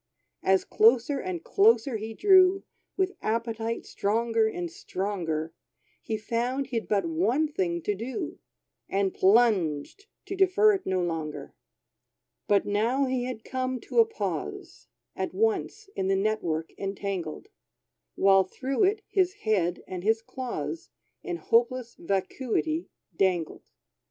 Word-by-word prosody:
As 190 0 +3
closer 240 +5 +4
and 355 0 -4
closer 395 - +3
he 220 +1 -6
drew, 380 - +5 0.3
With 380 0 0
appetite 230 0 -2
stronger 225 +2 +1
and 175 -6 -4
stronger, 165 -5 -3 0.5
He 220 - -3
found 240 +5 -1
he'd 240 -4 -3
but 200 -4 +1
one 205 - +1
thing 175 - -2
to 210 - 0
do, 265 - -5 0.5
And 195 -1 0
plunged, 195 - +2 0.2
to 390 - -4
defer 390 +3 +5
it 390 -1 -3
no 185 -1 +1
longer. 160 -3 -4 0.9
But 205 -1 +3
now 230 +7 +1
he 255 -1 -1
had 245 -3 -5
come 255 -1 -2
to - - -1
a 455 - +8
pause, 445 - -5 0.3
At - - -3
once 435 0 0
in 190 - -1
the 195 - +2
net 215 +2 0
work 160 -1 -2
entangled, 195 - -4 0.7
While 195 -1 +5
through 270 - 0
it 415 +2 0
his 370 -2 +1
head 180 -5 +1
and 180 -1 -6
his 225 +2 +2
claws 225 - -5 0.3
In 175 - -4
hopeless 235 +6 +1
vacuity 240 - -2 0.3
dangled. 180 -4 0
225 Hz, 130 wpm, -27 LUFS, 190-275 Hz, 0.9 s, a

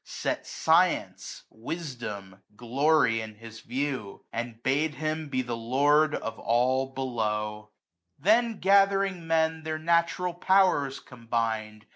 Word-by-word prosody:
Set - - -4
science, - - +1
wifdom, 110 - -6
glory, 120 0 +2
in 110 -1 -8
his 115 +1 -11
view. 125 -3 -4
And 115 0 -5
bade 145 +3 +1
him 155 0 -3
be 130 -2 -1
the 120 -1 -4
Lord 145 +6 +2
of 115 - -5
all 130 +3 +1
below* 105 -5 -3 0.5
95 - - -28
Then 225 +1 +3
gathering 195 -2 +3
men 160 0 +1
their 155 0 -3
natural 170 +2 +1
powers 175 -7 +2
combined 115 -3 -3
135 Hz, 120 wpm, -27 LUFS, 115-160 Hz, 0.5 s, Then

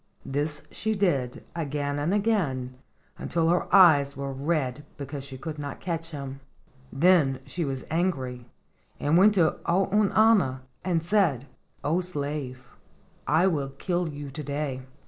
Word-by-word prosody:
This 145 +2 -2
she 220 +1 -1
did 140 -11 0
again 145 -2 -2
and 150 +5 0
again, 180 - 0 0.5
until 165 -1 0
her 175 +2 +2
eyes 150 -7 +6
were 140 0 -4
red 145 -1 -1
because 140 0 -6
she 135 -1 -7
could 155 +2 -6
not 145 -1 -5
catch 165 -2 -3
him. 140 -3 -7 0.5
Then 145 -3 +4
she 175 - -3
was 135 -2 -4
angry, 130 -8 -1 0.5
and 145 +3 +1
went 205 +4 +6
to 165 -5 +2
Ounauna 195 -5 +3 0.2
and 170 -3 0
said: 170 - +2 0.4
"O 155 +5 +1
slave, 145 -6 -4 0.6
I 160 +4 +4
will 145 -7 0
kill 175 +1 -1
you 145 -1 -7
to 150 +3 -6
day. 140 -2 -3
150 Hz, 140 wpm, -27 LUFS, 135-175 Hz, 0.6 s, eyes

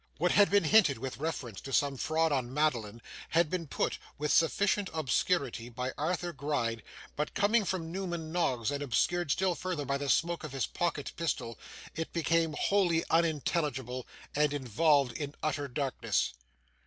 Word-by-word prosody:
What 175 +2 +2
had 205 -1 +5
been 205 -1 +4
hinted 165 - +5
with 130 +2 -5
reference 135 -9 -4
to 135 - -8
some 140 0 +2
fraud 160 +4 +1
on 130 -3 0
Madeline, 120 -7 0 0.3
had 165 -1 +2
been 175 -3 -2
put, - - -1 0.2
with 150 0 -1
sufficient 195 +5 +2
obscurity 135 -5 0
by 125 +2 -4
Arthur 175 +3 -2
Gride, 135 -6 -1 0.3
but 150 +1 -3
coming 210 +3 +3
from 170 -3 -2
Newman 170 -4 -4
Noggs, 130 -9 0
and 145 0 -3
obscured 150 +6 +1
still 185 +5 +2
further 175 -4 -3
by 140 +1 -1
the 140 -1 -3
smoke 170 +2 +1
of 150 -4 -6
his 135 - 0
pocket 165 -5 -2
pistol, 120 -9 -2 0.4
it 160 +1 -3
became 165 -1 +1
wholly 180 -5 +2
unintelligible, 150 -6 0 0.3
and 150 0 +2
involved 140 +1 +3
in 145 +2 -5
utter 145 -2 -1
darkness. 135 - -1
150 Hz, 160 wpm, -31 LUFS, 135-170 Hz, 0.4 s, had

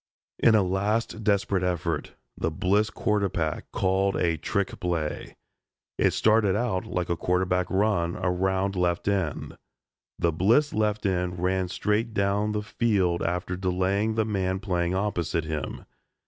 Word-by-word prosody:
In 115 - +5
a 105 - +4
last 105 +4 -1
desperate 100 -2 +1
effort, 90 -3 -2 0.2
the 80 - -1
Bliss 100 +6 +1
quarterback 100 -7 -1
called 95 +1 +1
a 85 -1 +1
trick 100 +3 -2
play. 85 -4 -3 0.6
It - - +3
started 110 -3 +3
out 105 -5 -1
like 90 -1 -2
a 85 - 0
quarterback 90 +1 0
run 95 -4 +1
around 95 +2 0
left 90 0 0
end. 95 -7 -2 0.6
The 85 - +1
Bliss 115 - +3
left 105 0 0
end 90 -2 0
ran 95 +1 0
straight 105 +5 -1
down 100 +2 +1
the 105 0 -2
field 100 -6 +1
after 90 +1 -2
delaying 95 +4 0
the 110 -1 +1
man 95 -3 -1
playing 90 -3 -1
opposite 85 -5 -1
him. 75 -3 -4
95 Hz, 140 wpm, -26 LUFS, 90-105 Hz, 0.6 s, In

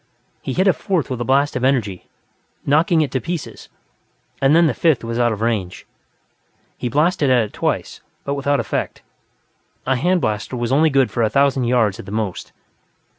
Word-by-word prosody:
He 130 - -4
hit 185 +6 +1
a 190 - +5
fourth 175 -9 -2
with 125 -2 -3
a - - +1
blast 140 +3 +1
of 125 - -2
energy, 115 -9 0 0.6
knocking 160 +4 +3
it 145 -4 -1
to 130 - -1
pieces, 170 -3 -6 0.7
and 135 +3 +4
then 170 0 +5
the 150 - +2
fifth 160 -5 +1
was 115 +1 -3
out 120 -1 +2
of 110 -1 -4
range. 105 -6 -2 0.9
He 125 - -4
blasted 150 +2 +1
at 125 -3 +4
it 105 - -8
twice, - - -3 0.2
but 140 - -2
without 140 0 0
effect; - - -3 0.8
a 130 - +1
hand 180 +7 +1
blaster 110 0 -3
was 120 0 -2
only 155 +4 +4
good 135 -3 +2
for 120 - -2
a 110 - +2
thousand 140 -1 +2
yards 115 -5 +1
at - - -9
the - - -7
most. 105 -4 -4
130 Hz, 190 wpm, -20 LUFS, 115-150 Hz, 0.9 s, a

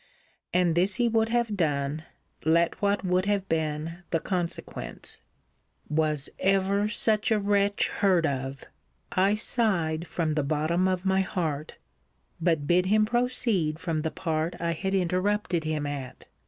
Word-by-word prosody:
And 180 -2 +3
this 185 +4 +2
he 240 -1 +2
would 225 -1 +2
have 235 -2 0
done, 150 -3 -1 0.4
let 170 +4 +2
what 200 -1 +1
would 185 +1 +1
have 200 -2 0
been 160 +2 -2
the 165 - +1
consequence. 175 -1 -4 0.7
Was 150 -2 +1
ever 195 +1 +2
such 215 +1 +2
a 220 - +4
wretch 200 0 +2
heard 185 -4 +2
of! 135 -2 -3 0.5
I 195 +3 +3
sighed 180 -8 0
from 160 -2 -1
the 150 - +1
bottom 155 +5 +1
of 185 0 -1
my 190 0 +3
heart; 160 -6 -3 0.7
but 160 -4 +1
bid 180 +4 +3
him 215 +2 +4
proceed 235 -9 0
from 165 -2 -2
the 160 - -1
part 160 0 -2
I 170 0 0
had 190 +4 -2
interrupted 185 -1 0
him 155 -1 -1
at. 140 -3 -6
180 Hz, 145 wpm, -27 LUFS, 155-200 Hz, 0.7 s, a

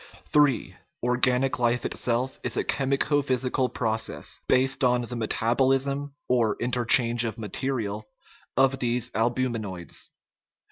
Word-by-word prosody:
III. 145 -4 +3 0.3
Organic 125 +1 +1
life 120 0 +1
itself 125 +2 -2
is - - -2
a - - +1
chemico 140 +2 +1
physical 130 -1 0
proc 110 -2 -1
ess, - - -5
based 130 +1 +2
on 125 -1 +3
the 120 +1 -6
metabolism 135 +5 0
(or 115 -4 +2
interchange 120 -1 +3
of 115 -3 -3
mate 105 -4 -3
rial) 110 -6 -2 0.5
of 135 0 +3
these 120 0 -1
albuminates. 115 -6 -2
125 Hz, 125 wpm, -26 LUFS, 115-130 Hz, 0.5 s, III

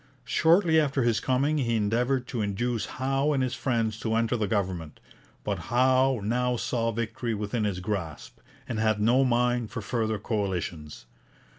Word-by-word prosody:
Shortly 165 -1 +4
after 140 -3 +1
his 115 -2 +2
coming 140 +5 +1
he 115 -3 0
endeavoured 120 +5 +1
to 120 -4 -2
induce 110 +3 -1
Howe 135 +3 0
and 135 -2 +1
his 130 - -1
friends 115 -4 -1
to 110 -1 -1
enter 115 +1 +1
the 110 -3 -1
government, 90 -6 -2 0.4
but - - -2
Howe 130 0 +3
now 125 +3 0
saw 115 -1 -1
victory 115 +1 -3
within 105 +2 -2
his 100 -3 -2
grasp, 90 -6 -5 0.3
and 115 - -3
had 110 -1 +2
no 120 +5 +4
mind 120 -2 +1
for 120 -2 -5
further 110 0 -1
coalitions. 95 - -4
115 Hz, 160 wpm, -27 LUFS, 105-130 Hz, 0.4 s, Shortly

